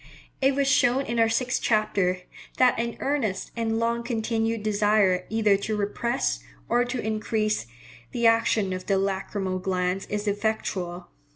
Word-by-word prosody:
It 270 0 +3
was 280 -1 +1
shown 265 0 +3
in 235 0 -2
our 225 0 +4
sixth 245 +2 0
chapter, 195 -4 +1 0.4
that 255 -1 +5
an 235 0 -2
earnest 265 -9 -1
and 225 -1 -1
long 230 +1 0
continued 225 -2 -1
desire 205 -3 +2
either 215 -2 +3
to 215 +2 -3
repress, 235 +4 -1 0.3
or 240 +1 +3
to 245 +1 -3
increase, 215 - -1 0.4
the 235 - -1
action 225 -3 +3
of 185 0 -6
the 195 - +2
lacrymal 190 -1 -2
glands 185 0 -1
is 210 0 -3
effectual. 195 -4 -2
215 Hz, 150 wpm, -26 LUFS, 195-235 Hz, 0.4 s, that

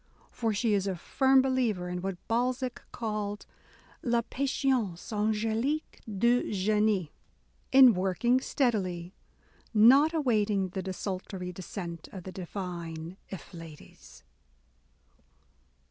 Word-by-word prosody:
For 225 -2 -1
she 215 +1 +1
is 200 -1 +1
a 190 - -1
firm 265 +9 +3
believer 240 -9 0
in 180 0 -4
what 190 -1 -3
Balzac 250 +2 -1
called 210 -2 -3 0.6
/« 235 -1 0
patience 260 -10 0
angdique 220 +7 -1
du 235 +5 +2
genie," 210 -4 +1 0.6
in 260 -3 +9
working 195 +7 +2
steadily, 190 -11 -1 0.4
— - - -32 0.2
not 290 +4 +5
awaiting 215 - +1
the 190 +1 -4
desultory 185 -1 -5
descent 170 -2 -7
of 190 -3 -8
the 185 - -7
divine 175 -2 -6
afflatus. 165 -2 -11
205 Hz, 105 wpm, -29 LUFS, 185-240 Hz, 0.6 s, in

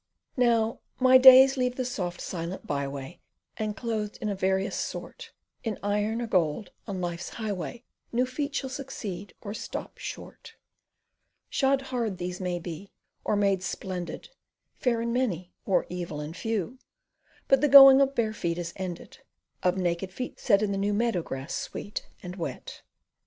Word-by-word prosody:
Now 230 -3 +2 0.2
my 260 0 +7
days 265 +1 +9
leave 250 -1 0
the 255 - -2
soft 185 -8 -3
silent 170 +1 -5
byway, 140 +3 -4 0.4
And 215 -1 -3
clothed 220 -3 -3
in 215 - -2
a 200 - -1
various 190 +1 0
sort, 465 -2 -6 0.3
In 225 -3 -2
iron 210 +3 0
or - - -1
gold, 180 -2 0 0.2
on 195 -3 -4
life's 175 0 -4
highway 220 +1 -5 0.3
New 245 +2 +2
feet 280 +3 -4
shall 265 -2 -2
succeed, 210 -8 -6
or 205 -1 -6
stop - - -6
short - - -8 1.0
Shod 270 0 +2
hard 235 -7 -2
these 180 +1 -4
maybe, 175 0 -4 0.3
or - - +1
made 200 -2 +2
splendid, 185 -1 -5 0.4
Fair 235 -3 0
and 235 0 -1
many, 185 -9 -1
or 190 - +2
evil 175 -4 -5
and 150 +2 -6
few, 225 +3 -3 0.7
But 270 - +4
the 295 - +4
going 270 0 +11
of 275 0 +2
bare 220 -2 +1
feet 170 -5 -2
has 170 -1 -4
ended, 185 -2 -6 0.4
Of 180 +1 +2
naked 180 +1 -1
feet 250 +6 -6
set 200 -2 +3
in 205 - 0
the 195 - -1
new 205 +1 +1
Meadow 230 -5 +1
grass 135 -3 -6
sweet 205 - -5 0.2
and 180 +1 -7
wet. 150 -7 -6
205 Hz, 160 wpm, -27 LUFS, 180-245 Hz, 1.0 s, going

